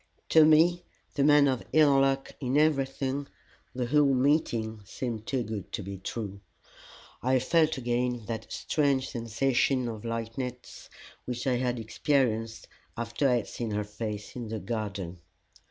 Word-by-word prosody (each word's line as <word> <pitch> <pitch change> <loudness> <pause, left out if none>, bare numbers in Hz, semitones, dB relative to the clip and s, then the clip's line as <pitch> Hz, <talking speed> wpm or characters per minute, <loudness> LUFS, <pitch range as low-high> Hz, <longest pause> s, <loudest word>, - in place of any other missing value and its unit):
To 160 - +7
me, 165 +3 +5 0.3
the 140 - +1
man 145 0 +6
of 130 -3 0
ill 145 -3 +6
luck 135 0 +1
in 130 0 0
everything, 140 -2 +1 0.5
the 125 -1 -1
whole 140 +1 +3
meeting 120 -6 +1
seemed 115 +1 -5
too 130 -3 0
good 105 -5 -6
to 105 - -3
be 100 0 -7
true. 100 -1 -5 0.8
I 130 +1 +3
felt 155 +4 +2
again 120 -1 -1
that 110 0 -5
strange 140 -3 0
sensation 125 +2 +1
of 110 -2 -6
lightness 115 +2 -5 0.4
which 125 -1 -4
I 130 -2 +2
had 125 0 -1
experienced 115 -1 0 0.3
after 115 +4 0
I 125 - +4
had 120 - -1
seen 120 -2 -4
her 105 0 -1
face 105 0 -6
in 120 -2 -5
the 110 +1 -4
garden. 100 -4 -4
125 Hz, 150 wpm, -28 LUFS, 110-135 Hz, 0.8 s, To